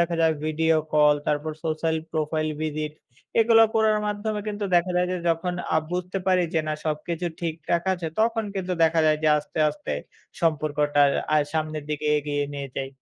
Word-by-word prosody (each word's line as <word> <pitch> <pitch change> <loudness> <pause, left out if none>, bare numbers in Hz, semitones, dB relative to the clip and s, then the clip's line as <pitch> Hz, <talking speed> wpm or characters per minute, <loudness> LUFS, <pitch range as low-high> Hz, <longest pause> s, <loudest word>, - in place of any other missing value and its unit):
দেখা 170 0 +1
যায় 160 -1 +4
video 160 +1 +2 0.2
call, 150 -1 +5
তারপর 150 +1 0
সোশ্যাল 160 0 0
প্রোফাইল 155 0 -1
ভিজিট। 155 -1 -3 0.5
এগুলা 225 0 +6
করার 220 -1 +3
মাধ্যমে 210 +1 -2
কিন্তু 205 -1 -3
দেখা 175 +1 +3
যায় 180 - +2
যে - - -1
যখন 165 +2 0 0.2
আ - - +5
বুঝতে 180 +2 -2
পারি 185 -1 +4
যে 160 - +3
না - - 0
সবকিছু 160 +3 -2
ঠিকঠাক 165 0 -1
আছে 175 -2 -3
তখন 225 0 +1
কিন্তু 185 -2 -2
দেখা 165 0 +4
যায় 155 0 +4
যে 155 - +4
আস্তে, 150 - -8
আস্তে, 150 0 -6 0.5
সম্পর্কটা 150 -2 +1 0.3
আ - - +5 0.2
সামনের 155 -1 -2
দিকে 150 0 -2
এগিয়ে 145 0 -2
নিয়ে 140 -1 -5
যাই। 135 0 -2
160 Hz, 175 wpm, -25 LUFS, 150-180 Hz, 0.5 s, এগুলা